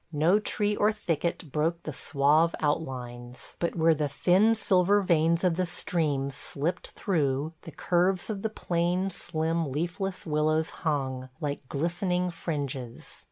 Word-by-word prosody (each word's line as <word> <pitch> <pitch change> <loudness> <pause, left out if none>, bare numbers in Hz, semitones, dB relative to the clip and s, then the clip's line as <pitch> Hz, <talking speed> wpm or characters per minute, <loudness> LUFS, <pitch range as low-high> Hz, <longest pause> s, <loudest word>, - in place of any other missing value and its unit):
No 165 +6 +3
tree 210 0 0
or 210 +1 +3
thicket 170 -6 -2
broke 165 +3 0
the 155 - -5
suave 150 +5 +2
outlines, 125 -5 -4
but 170 - -1
where 165 -1 +4
the 150 -1 -1
thin 190 +10 +4
silver 200 -1 +3
veins 170 -2 +2
of 175 -2 +2
the 185 - +1
streams 150 -6 -1
slipped 150 +6 -3
through 150 -4 0
the 165 - -10
curves 180 +3 +1
of 200 -2 -4
the 220 - -1
plain, 180 -1 0
slim, 165 -3 -2
leafless 180 +6 -3
willows 155 0 +1
hung, 130 -5 -1
like 145 -4 -4
glistening 180 +4 0
fringes. 140 -8 -5
165 Hz, 140 wpm, -28 LUFS, 145-180 Hz, -, where